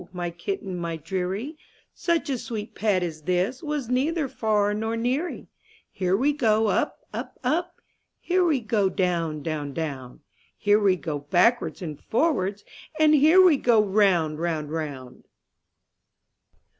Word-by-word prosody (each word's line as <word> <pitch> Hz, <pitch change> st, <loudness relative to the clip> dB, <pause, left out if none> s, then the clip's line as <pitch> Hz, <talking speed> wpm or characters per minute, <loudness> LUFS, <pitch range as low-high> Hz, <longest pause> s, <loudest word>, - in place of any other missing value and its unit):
my 175 Hz, -1 st, -3 dB
kitten, 195 Hz, -, -5 dB
my 170 Hz, -1 st, -3 dB
deary, 190 Hz, -, -4 dB, 0.4 s
Such 340 Hz, -2 st, 0 dB
a 260 Hz, -, -1 dB
sweet 220 Hz, -2 st, -6 dB
pet 200 Hz, -4 st, +1 dB
as 160 Hz, -3 st, -5 dB
this 185 Hz, -, -1 dB
Was 295 Hz, -5 st, -3 dB
neither 280 Hz, +5 st, 0 dB
far 210 Hz, -4 st, 0 dB
nor 220 Hz, +2 st, -2 dB
neary. 255 Hz, +9 st, -2 dB, 0.5 s
Here 185 Hz, 0 st, 0 dB
we 280 Hz, +6 st, +2 dB
go 225 Hz, -6 st, +2 dB
up, -, -, -1 dB
up, -, -, -6 dB
up. 345 Hz, +2 st, -1 dB, 0.4 s
Here 365 Hz, +1 st, +1 dB
we 305 Hz, -7 st, +2 dB
go 215 Hz, -3 st, +1 dB
down, 170 Hz, -5 st, -1 dB
down, 150 Hz, -3 st, -3 dB
down; 140 Hz, -5 st, -5 dB, 0.4 s
Here 205 Hz, 0 st, +3 dB
we 195 Hz, -3 st, +3 dB
go 155 Hz, -4 st, -4 dB
backwards 180 Hz, -, +1 dB
and 155 Hz, -4 st, -6 dB
forwards, 205 Hz, -, 0 dB, 0.3 s
And 310 Hz, -1 st, +5 dB
here 315 Hz, +6 st, +6 dB
we 325 Hz, -6 st, +6 dB
go 240 Hz, -4 st, +3 dB
round, 190 Hz, -7 st, +2 dB
round, 160 Hz, -3 st, -2 dB
round. 145 Hz, -6 st, -6 dB
205 Hz, 145 wpm, -25 LUFS, 170-260 Hz, 0.5 s, here